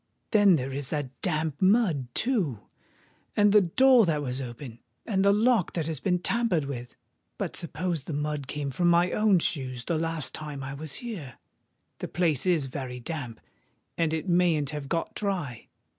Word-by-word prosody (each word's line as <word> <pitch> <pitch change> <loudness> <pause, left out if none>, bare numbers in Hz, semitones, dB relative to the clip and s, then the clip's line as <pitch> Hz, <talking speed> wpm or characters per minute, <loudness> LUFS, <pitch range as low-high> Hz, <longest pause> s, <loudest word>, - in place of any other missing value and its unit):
"Then 205 -4 +6
there 135 -2 -2
is 140 -1 -2
that 145 -4 -2
damp 155 -4 -1
mud, 185 - +3
too—and 205 - -2
the 210 - +7
door 240 +5 +5
that 150 -3 0
was 130 0 -3
open—and 130 - -5
the 200 - +5
lock 220 -2 +2
that 165 -3 -1
has 160 -3 -3
been 180 +2 +1
tampered 180 -4 +1
with! 125 -3 -6 0.4
But - - -3
suppose 170 -2 -3
the - - -5
mud 150 -1 -2
came 145 0 -3
from 175 +7 +1
my 175 +1 +4
own 210 -3 +4
shoes 130 -7 -2
the 165 -3 0
last 165 -2 -2
time 150 -3 -6
I 135 +1 -5
was 145 +1 -5
here? 170 - -7 0.6
the - - -4
place 165 -3 0
is 165 -6 +2
very 130 -2 -6
damp—and 150 +4 -6
it 160 +3 -2
mayn't 170 -5 +2
have 145 -2 -6
got 165 -1 -2
dry. 175 - -3
160 Hz, 165 wpm, -27 LUFS, 140-185 Hz, 0.6 s, the